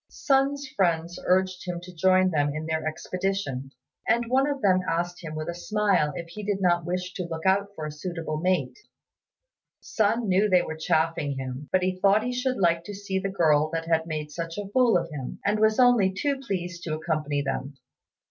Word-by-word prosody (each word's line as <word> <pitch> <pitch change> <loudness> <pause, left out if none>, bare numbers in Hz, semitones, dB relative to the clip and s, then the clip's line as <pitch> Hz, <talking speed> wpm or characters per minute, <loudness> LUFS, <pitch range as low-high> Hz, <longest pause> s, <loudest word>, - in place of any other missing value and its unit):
Sun's 275 -1 +1
friends 170 -5 0
urged 185 0 +1
him 175 -1 -3
to 180 +1 -11
join 185 +2 +3
them 145 -2 +1
in 155 +1 -4
their 160 0 -2
expedition, 180 -5 -3 0.4
and 235 +1 +2
one 265 +2 +3
of 285 -1 -2
them 185 -2 +4
asked 175 +2 -2
him 155 -1 -6
with 155 0 -4
a 170 - -2
smile 190 -4 +1
if 170 - -5
he 210 +5 -7
did 205 -1 -1
not 175 -2 +2
wish 180 +1 -3
to 180 -2 -4
look 160 +1 -5
out 195 +1 +3
for 155 - -5
a 155 - -4
suitable 160 0 -4
mate. 160 -8 0 1.0
Sun 220 +1 0
knew 195 +3 +3
they 180 -2 +4
were 160 - -5
chaffing 160 -2 0
him, 130 +2 -6
but 185 -1 +2
he 185 0 -1
thought 200 +3 +4
he 250 +1 -2
should 255 +1 -1
like 170 -3 +2
to 205 - -6
see 195 -1 -2
the 195 - -2
girl 155 -5 +3
that 165 0 -3
had 165 0 +1
made 155 -2 -4
such 165 +2 -5
a 205 -1 -4
fool 235 -2 +4
of 175 - -2
him, 135 -4 -6
and 210 +1 +2
was 220 +1 +3
only 245 -6 +5
too 275 +8 -1
pleased 180 -8 -4
to 155 -3 -3
accompany 155 -3 -1
them. 135 +1 -3
180 Hz, 205 wpm, -26 LUFS, 160-200 Hz, 1.0 s, only